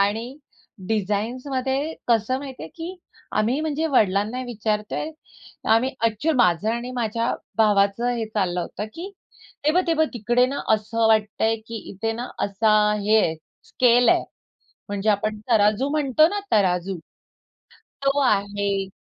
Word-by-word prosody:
आणि 225 +6 0 0.5
डिझाईन्समध्ये 255 +8 -1
कसं 235 +2 +2
माहिती 270 -2 -8
आहे, 160 - -7
की 345 +3 -7 0.4
आम्ही 240 +7 +1
म्हणजे 315 0 -1
वडिलांना 215 -2 +1
विचारतोय. 215 +4 -2 0.6
आम्ही 230 +4 +4 0.2
ऍक्च्युअली 245 +8 0
माझं 180 -2 +3
आणि 240 +2 -4
माझ्या 230 -1 -1 0.2
भावाचं 210 +1 +3
हे 225 -1 -2
चाललं 190 -5 -1
होतं, 205 +4 -5
की 360 +4 -7 0.5
ते 300 - +4
बघ, 365 +3 +3
ते 335 - +2
बघ 315 0 +3
तिकडे 240 +2 +2
ना, 275 +2 -3
असं 225 +1 0
वाटतं 215 -1 +2
आहे 225 0 +2
की 230 - -6
इथे 225 +3 -2
ना, 240 +2 -5 0.2
असा 210 +2 +1 0.3
हे 210 +2 +3
आहे, 160 -6 +2 0.3
स्केल 245 -1 +3
आहे. - - +4 0.7
म्हणजे 205 +1 -1
आपण 215 +1 0
तराजू 215 +4 +3
म्हणतो 300 0 +3
ना, 410 +4 -2
तराजू 185 -2 +1 1.1
तो 275 +1 +2
आहे 200 -4 0
225 Hz, 140 wpm, -23 LUFS, 205-260 Hz, 1.1 s, आम्ही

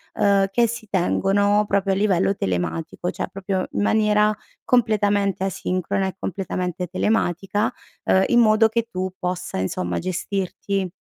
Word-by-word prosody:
uhm, 200 -1 +3
che 235 +4 +3
si 225 -1 -6
tengono 200 +2 +2
proprio 195 -1 +1
a - - 0
livello 195 -1 +2
telematico, 155 - -2
cioè, - - -4
proprio 190 -1 -2
in - - -1
maniera 210 0 +3 0.3
completamente 205 -5 +2
asincrona 190 +1 -1
e 190 - -5
completamente 180 -1 -3
telematica, 195 +2 0 0.3
uhm, 190 - +4
in 240 - +4
modo 220 -1 +5
che 230 +1 -1
tu 185 -2 -3
possa 180 - -3
insomma, 90 -1 -2
gestirti 190 +1 -2
195 Hz, 135 wpm, -22 LUFS, 185-210 Hz, 0.3 s, modo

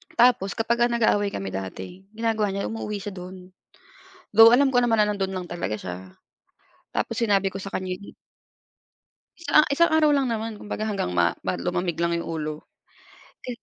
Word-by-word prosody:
Tapos 235 -5 +3
kapag, 235 +1 0
ah, - - -8
nag-aaway 205 -3 +2
kami 95 -1 -4
dati, 95 - -7
ginagawa 220 -3 0
niya 200 - -3
umuuwi 210 -2 -4
siya 205 - -5
do'n. 180 0 -10 0.8
Though, 225 +2 +9
alam 270 0 +3
ko 245 - +4
naman 230 -2 +2
nando'n 200 -2 -1
lang 185 - -4
talaga 170 -11 -3
siya. 90 -3 -6 1.0
Tapos - - -1
sinabi 200 -4 +2
ko 195 - -5
sa 195 - -6
kanya, 185 -1 -3
yi 200 +2 -13 1.2
Isa 335 - -6 0.2
isang 335 +4 +4
araw 310 -1 +4
lang 275 -2 +2
naman. 225 0 -3
Kumbaga, 210 +1 -4
hanggang 200 - -2
ma 85 - +5 0.2
ba - - 0
lumamig 175 -2 -2
lang 170 0 +1
yung 170 - -5
ulo. 155 0 -3 0.9
Ka - - -6
200 Hz, 170 wpm, -24 LUFS, 180-225 Hz, 1.2 s, Though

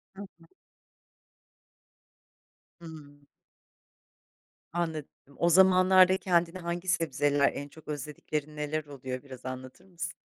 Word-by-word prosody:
Hı 195 - -9
hı. 180 -4 -13 2.3
Hıı. 150 -4 -12 1.5
Anladım. 160 -4 -2 0.3
O 170 - +3
zamanlarda 185 +1 +6
kendine 175 -1 +1
hangi 175 +1 -4
sebzeler 145 -4 +2
en 145 - -6
çok 160 +2 -17
özlediklerin 150 0 -5
neler 150 +1 -3
oluyor 130 -2 -7
biraz 130 -2 -12
anlatır 130 +6 -8
mısın? 175 -2 -6
160 Hz, 100 wpm, -29 LUFS, 145-175 Hz, 2.3 s, zamanlarda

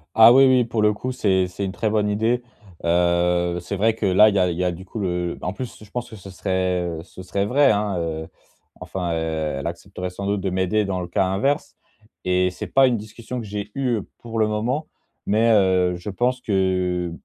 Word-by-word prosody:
Ah 115 +1 +9
oui, 135 +2 +7
oui. 130 -1 +5
Pour 115 -2 -2
le 105 0 +4
coup, 130 +5 -4
c'est 95 -7 +1
c'est 100 +2 -4
une 95 - -3
très 110 - -1
bonne 105 -1 +1
idée. 115 +4 0 0.4
Heu, 85 0 +2
c'est 100 - -4
vrai 110 +3 +2
que, 110 - -3
là, 100 +3 +6
il 100 - -2
y - - +3
a 90 - +3
il 85 - -5
y 90 - 0
a, 90 - +1
du 90 +3 -9
coup, 110 - -7
le 90 -2 -2
en 90 - -3
plus, 120 -1 -7
je 105 - -16
pense, 120 +3 -4
que 110 - -10
ce 95 -1 -11
serait, 95 -1 -1
heu, 85 -2 -4
ce 95 +1 -12
serait 100 +2 -1
vrai, 140 +1 +4
hein, 105 -3 0
heu. 80 -1 -3 0.5
Enfin, 90 -3 -4
heu, 80 -2 -2
elle - - -6
accepterait 90 +2 -5
sans 100 +2 -5
doute 100 -1 0
de 95 - -1
m'aider 95 +3 +1
dans 95 -2 -2
le 90 - -5
cas 90 +2 +1
inverse 135 +11 -1 0.5
et 90 0 +2
c'est 90 - -6
pas 135 0 +5
une 120 -2 +1
discussion 115 +4 -7
que - - -8
j'ai 105 0 -5
eue 125 -5 0 0.2
pour 115 -1 -6
le 110 - +3
moment, 120 +8 -1 0.4
mais, 110 +3 +3
heu, 95 -4 +3
je 90 +4 -7
pense 125 +5 0
que 90 -3 0
100 Hz, 235 wpm, -22 LUFS, 90-110 Hz, 0.5 s, Ah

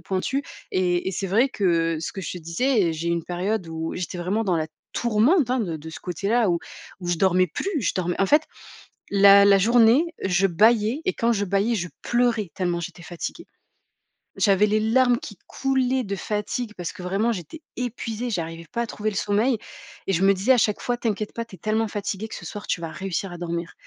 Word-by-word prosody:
pointues 225 +9 -2 0.3
et 180 -1 +1
et 190 - -3
c'est 195 - -2
vrai 230 +8 +3
que 165 -6 +1
ce 160 - -3
que 195 - -6
je - - -4
te 180 - -6
disais, 210 +10 +1
eh, - - 0
j'ai 165 +2 -3
eu - - +1
une 170 -1 -1
période 185 +2 -2
où 160 0 -4
j'étais 180 0 -4
vraiment 200 +6 -1
dans 180 -4 +1
la 155 -1 -1 0.3
tourmente, 240 - +3
hein, 255 - +2
de 170 -6 -2
de 160 +1 -10
ce - - -9
côté-là 200 +5 0
où 170 - +1 0.4
où 175 - -5
je 175 - +1
dormais 185 0 +3
plus. 335 - -3
Je 195 - 0
dormais 175 0 -1
en 195 - +4
fait, 300 +6 +5 0.7
la 200 0 +7
la 200 -1 +6
journée, 235 - +5 0.2
je 190 +1 +3
bâillais 220 - +3
et 375 - +1
quand 235 +1 +1
je 205 -2 0
bâillais, 200 +4 +1
je 175 - -2 0.2
pleurais 240 -5 +1
tellement, 175 -2 -1
j'étais 170 0 -7
fatiguée. 175 -1 -6 0.9
J'avais 205 0 +4
les 215 +1 +2
larmes 240 +2 +3
qui 205 -5 -9
coulaient 265 -1 0
de 200 -2 -3
fatigue 215 +3 -3
parce 175 -2 -4
que, 205 - -11
vraiment, 195 +6 0
j'étais 200 - -7 0.2
épuisée. 245 -1 -3
J'arrivais 165 -4 -4
pas 235 - -1
à - - 0
trouver 215 0 -2
le 200 - -7
sommeil 215 +5 +1 0.5
et 195 - +1
je 180 +3 +1
me 195 - +6
disais, 200 +7 +1
à 250 - +3
chaque 210 -2 +1
fois: 245 -1 -1
«T'inquiète 215 -3 -2
pas. 230 0 -4
Tu 195 - -12
es - - -18
tellement 215 +4 0
fatiguée 205 +1 -4
que - - -8
ce - - -9
soir, 205 -1 -7
tu - - 0
vas 165 - -4
réussir 190 0 -4
à 175 - -7
dormir» 170 -1 -4
200 Hz, 225 wpm, -24 LUFS, 180-230 Hz, 0.9 s, la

